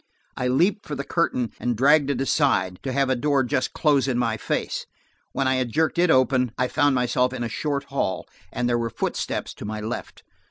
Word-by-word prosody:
I 125 - -1
leaped 175 - +1
for 150 - -4
the 140 - -4
curtain 125 -8 0
and 120 -2 -1
dragged 145 +3 +4
it 140 -3 -1
aside, 130 - +1
to 135 - -3
have 135 +1 +1
a - - +3
door 140 +1 +1
just 125 +1 -1
close 140 -4 +2
in 125 -3 0
my 115 -2 +1
face. 110 - -3 0.4
When 135 - 0
I 130 0 +2
had 125 -2 -1
jerked 160 +5 +1
it 180 0 +4
open, 130 -3 +3
I 125 0 0
found 145 -2 +2
myself 125 +1 +1
in 125 -2 -3
a - - -1
short 140 +2 -2
hall, 135 -9 -2 0.3
and 125 - -1
there 120 -1 +1
were 115 0 -1
footsteps - - -3
to - - -10
my 110 +1 -4
left. 110 +3 -6
130 Hz, 215 wpm, -24 LUFS, 120-140 Hz, 0.4 s, dragged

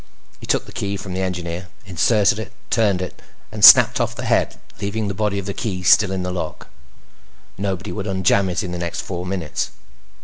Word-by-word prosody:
He - - -11
took - - +1
the - - -12
key 100 0 -3
from 95 -1 -7
the 95 - -2
Engineer, 90 -1 -4 0.2
inserted 100 +3 +2
it, 110 - -7 0.2
turned 100 -5 +2
it, 90 - -8 0.3
and 105 -1 -6
snapped - - +9
off - - -2
the - - -6
head, - - 0 0.2
leaving 105 +1 -2
the 100 - -2
body 105 0 -1
of 100 - -4
the 100 - -4
key 95 -5 -4
still 95 +2 +5
in 95 -1 -2
the 90 - -3
lock. 90 - -6 0.9
Nobody 95 0 -4
would 105 -1 -5
unjam 95 0 +2
it 90 +4 -2
in 90 - -5
the 90 - -4
next 85 -1 -3
four 90 -1 -6
minutes. 90 -5 -3
95 Hz, 205 wpm, -20 LUFS, 90-100 Hz, 0.9 s, snapped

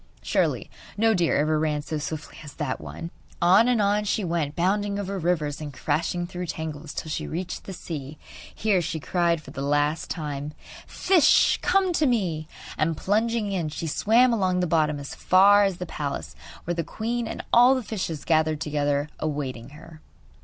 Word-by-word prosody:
Surely - - 0 0.3
no 225 +1 +4
deer 175 -5 +2
ever 155 +1 +2
ran 150 -1 0
so 155 0 -3
swiftly 155 0 -6
as 150 - -10
that 150 -5 -3
one! 165 +1 -7 0.3
On 190 +6 +5
and 245 -2 +2
on 205 +1 +2
she 210 0 0
went, 165 -4 -1
bounding 200 +3 0
over 200 -1 -3
rivers 155 -4 -1
and 150 -1 -5
crashing 165 +6 -1
through 180 0 -6
tangles 155 -1 -5
till 155 - -5
she - - -3
reached 180 +2 -5
the - - -7
sea. 150 -4 -7 0.4
Here 205 -4 +2
she 160 -1 -3
cried 170 0 0
for - - -11
the 135 - -6
last 145 +2 0
time: 150 -2 -4 0.3
'Fish, 365 -5 +4
come 375 0 +2
to 310 -3 +2
me!' 175 -11 0 0.3
And, 160 0 +1
plunging 220 +1 0
in, 175 -5 -1
she 155 +2 -5
swam 230 +10 +3
along 185 -4 +1
the 180 - +1
bottom 155 -3 +1
as 140 - -7
far 200 +2 +5
as 195 -3 -1
the 180 - -5
palace, 145 -4 -5 0.3
where 175 - -2
the 170 -1 -2
queen 230 +6 -3
and - - -5
all 245 +3 +7
the 255 - -2
fishes 185 -8 -4
gathered 155 -2 +2
together 145 -2 0
awaiting 140 -6 -3
her. 155 +2 -14
170 Hz, 180 wpm, -25 LUFS, 150-200 Hz, 0.4 s, all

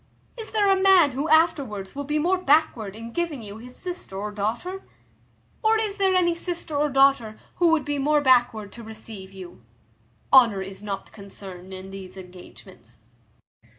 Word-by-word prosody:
Is 450 -3 -7
there 420 -2 +1
a 385 -1 +3
man 375 -6 +6
who 275 +5 -3
afterwards 280 - +2
will 285 0 -5
be 300 +2 -1
more 360 +5 +1
backward 280 - +1
in 230 +1 -8
giving 335 -8 -3
you 205 +1 -9
his 250 +2 -12
sister, 355 - -7
or 210 +1 -4
daughter? 235 - -3 0.8
or 445 0 +3
is 425 -2 -2
there 385 -2 +2
any 345 -2 +3
sister 340 -2 -5
or 295 +1 +1
daughter 270 -5 +3 0.2
who 345 -1 +4
would 325 -2 +2
be 290 -1 -2
more 295 +2 +3
backward 240 -6 +2
to 235 - -10
receive 220 -3 -10
you? 185 -8 -11 0.7
Honour 230 -7 +6
is 190 0 -9
not 200 -2 -6
concerned 190 -2 -10
in 190 0 -8
these 195 -1 -10
engagements." 180 - -14
250 Hz, 170 wpm, -24 LUFS, 200-335 Hz, 0.8 s, man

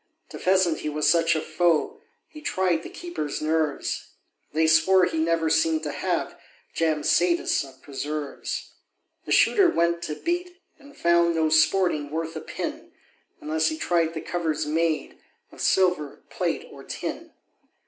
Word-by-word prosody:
To - - -9
pheasant 185 -3 +2
he 150 - -3
was 150 0 0
such 170 0 +4
a - - +1
foe, 175 - +1 0.3
He 305 - -12
tried 185 - 0
the - - -9
keepers' 345 - -5
nerves; 155 -1 -1 0.4
They 160 +2 +2
swore 160 +4 +5
he 160 - -2
never 165 0 +1
seem'd 160 0 +2
to 150 - -3
have - - -2 0.3
Jam 155 -2 0
satis 170 -2 +2
of 135 -1 -15
preserves. 145 +1 -5 0.5
The - - -6
Shooter 395 -5 +5
went 170 - +1
to 150 - -4
beat, 350 - -3 0.2
and 285 -1 -17
found 170 0 +3
No 160 -1 +2
sporting 160 -1 +3
worth 165 +1 -4
a 160 - -5
pin, - - -6 0.5
Unless 155 +1 0
he 315 - -2
tried 170 - 0
the 160 - -3
covers 160 -3 -2
made 160 +1 -1 0.3
Of - - -11
silver, 180 -6 +1
plate, - - -2
or - - -12
tin. - - -6
165 Hz, 155 wpm, -25 LUFS, 155-175 Hz, 0.5 s, swore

